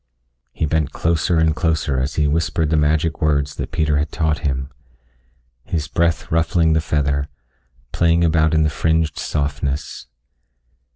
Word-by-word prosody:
He - - -2
bent 80 -1 0
closer 85 +1 +1
and 80 -1 +2
closer 80 -6 0
as 65 +3 -2
he 75 -2 +2
whispered 80 0 0
the - - +3
magic 75 +1 +1
words 70 -2 +1
that - - -4
Peter 80 -2 +1
had 75 0 -2
taught 80 -1 0
him, 65 -2 -3 0.9
his 80 -3 -3
breath 85 -2 0
ruffling 80 0 +2
the 80 - +2
feather, 70 -2 0 0.6
playing 85 0 +2
about 80 -1 +2
in 80 - +3
the 75 - +1
fringed 80 +1 0
softness. 70 -2 -3
80 Hz, 150 wpm, -20 LUFS, 75-80 Hz, 0.9 s, the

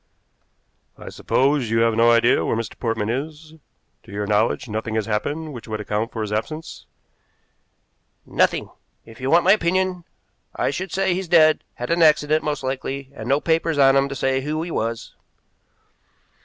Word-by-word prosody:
"I - - -9
suppose 135 -2 0
you 115 0 +2
have 115 0 +3
no 115 +1 +4
idea 120 +1 +4
where - - 0
Mr. 115 -2 -4
Portman 115 -3 -1
is? 155 +4 -6 0.5
To - - -16
your 105 +1 -3
knowledge 105 +4 0
nothing 110 0 -4
has 110 -2 0
happened 145 +9 -3
which 120 -2 -10
would 110 -1 -4
account 105 +2 -2
for 110 - -4
his 105 - -5
absence?" 155 +10 -5 1.4
"Nothing. - - 0 0.3
If 115 +2 -14
you 130 - -2
want 170 +3 +5
my 190 - +5
opinion 185 -2 +1 0.5
I - - 0
should 185 +5 -5
say 190 -1 +1
he's 185 +1 -3
dead, 155 -2 +4
had 120 +6 -5
an 170 0 +2
accident, 155 -1 +4
most 150 -2 -3
likely, 135 +1 -4
and 115 -3 -7
no 140 +2 +3
papers 165 0 0
on 135 -1 +5
him 135 0 +2
to 140 - -5
say 135 0 0
who 155 +3 -3
he 170 - -6
was." 115 -3 -3
135 Hz, 175 wpm, -22 LUFS, 115-160 Hz, 1.4 s, want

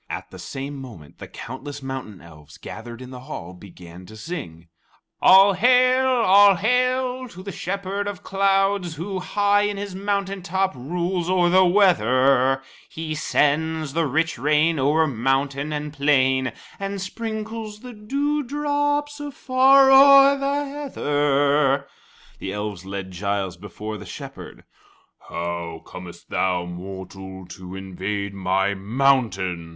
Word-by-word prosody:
At - - -6
the - - -11
same 140 +1 -6
moment, 110 - -12
the - - -8
countless 140 +3 -8
mountain 130 -7 -6
elves 75 -1 -15
gathered 120 +6 -9
in 125 - -11
the 125 - -8
hall 90 -8 -8
began 90 -1 -13
to 110 - -12
sing: 90 - -7 0.5
"All 195 +1 +7
Hail, 255 +5 +4
All 205 -5 +6
Hail 255 +4 0
to 185 -5 -12
the 200 - -6
Shepherd 195 +2 -4
of 205 -1 -6
Clouds, 195 -2 +1
Who, 185 +4 -4
high 205 +2 +2
in 205 0 -1
his 200 -1 -5
mountain 200 0 -2
top, 190 +1 -1
rules 175 +6 -3
o'er 180 -2 +3
the' 185 +1 +6
weather; 135 - +3 0.3
He 160 -1 -5
sends 155 0 0
the 165 -1 +1
rich 160 0 -1
rain 150 +3 +2
over 150 +4 +3
mountain 135 +2 -1
and 150 0 -4
plain, 130 -3 +2 0.3
And 200 0 -4
sprinkles 220 +1 -6
the 250 -1 -9
dew 280 +8 -1
drops 290 +1 -1
afar 270 -1 +4
o'er 275 +1 +8
the 280 +1 -1
heather." 145 - +1 0.5
The 95 - -5
elves 105 -3 -5
led 95 -1 -6
Giles 95 0 -2
before 105 +3 -8
the - - -10
Shepherd. - - -10 0.7
"How 85 -1 -5
comest 90 -2 -11
thou, 90 -2 0
mortal, 95 +1 -9
to 90 +1 -9
invade 95 +1 -4
my 95 +1 0
mountain?" 100 -6 0
150 Hz, 135 wpm, -23 LUFS, -, 0.7 s, o'er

